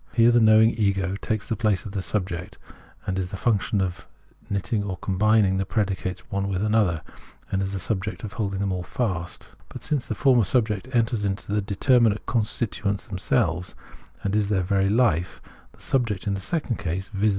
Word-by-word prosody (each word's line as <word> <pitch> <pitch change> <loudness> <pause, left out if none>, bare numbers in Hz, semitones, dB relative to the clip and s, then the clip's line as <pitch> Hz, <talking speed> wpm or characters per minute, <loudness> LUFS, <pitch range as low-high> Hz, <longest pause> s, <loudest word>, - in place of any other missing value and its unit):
Here 115 0 +5
the 120 - +5
knowing 110 0 +6
ego 100 -4 0
takes 110 -3 -2
the 115 - -1
place 105 -5 0
of 105 - -6
that 100 -1 -2
subject 90 -3 -3 0.5
and 95 0 -1
is 90 -1 -2
the 95 - -6
function 105 -1 +1
of 90 -2 -3 0.4
knit 100 -1 -1
ting 105 -3 -1
or 95 -3 -4
combining 100 +1 +2
the 95 - +1
predicates 95 -2 -2
one 100 0 -1
with 95 0 -1
another, 105 -7 +2 0.5
and 95 - +1
is 95 0 -2
the 95 - -2
subject 100 +4 -3
holding 100 -2 -3
them 95 -2 -1
fast. 90 -4 -3 0.2
But - - -9
since 145 -4 -1
the - - -2
former 130 -5 +4
subject 110 0 0
enters 115 -3 +1
into 100 0 -2
the 105 - +2
determinate 110 +2 +2
constitu 110 -2 -1
ents 100 -1 -2
themselves, 95 -3 -1 0.5
and 100 0 0
is 105 -1 +1
their 95 -3 +1
very 95 +1 +2
life, 100 -7 +2 0.3
the - - -20
subject 115 -7 0
in 100 - 0
the 100 - -3
second 140 - -2
case 95 +1 -3
— 95 - -23
viz. 105 +2 +2
100 Hz, 195 wpm, -25 LUFS, 95-110 Hz, 0.5 s, knowing